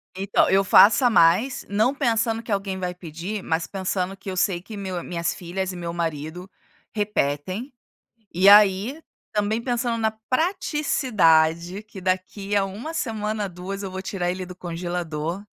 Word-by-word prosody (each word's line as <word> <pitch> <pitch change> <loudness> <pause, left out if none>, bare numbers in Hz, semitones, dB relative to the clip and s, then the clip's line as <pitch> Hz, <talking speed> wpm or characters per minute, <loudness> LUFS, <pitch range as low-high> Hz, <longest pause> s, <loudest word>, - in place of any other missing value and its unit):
Então 195 +1 +2
eu 195 +1 +4
faço 210 +6 +6
a - - +6
mais, 220 +7 +3
não 220 +6 +2
pensando 230 -4 0
que 230 - -8
alguém 195 -1 -1
vai 180 -1 -3
pedir, 180 +4 -6
mas 160 0 -1
pensando 190 0 -3
que 195 - -8
eu 185 - -4
sei 175 -2 +1
que 215 +3 -10
meu 190 -3 -4
minhas 170 -1 -2
filhas 185 +2 -4
e - - -8
meu 170 -1 -5
marido 165 +2 -4 0.4
repetem, 205 - -2 0.6
e 190 +3 +5
aí 205 +8 +5 0.3
também 215 +2 0
pensando 240 -1 -1
na 220 -1 +1 0.2
praticidade 205 - +2
que 215 -2 -11
daqui 190 +2 -2
a 195 - +3
1 225 +12 -7
semana 215 -7 -2
ou - - -3
2 185 +3 -6
eu 195 - -5
vou 190 0 -6
tirar 180 -2 -2
ele 185 0 -4
do 180 0 -9
congelador, 175 0 -4
195 Hz, 165 wpm, -24 LUFS, 180-215 Hz, 0.6 s, faço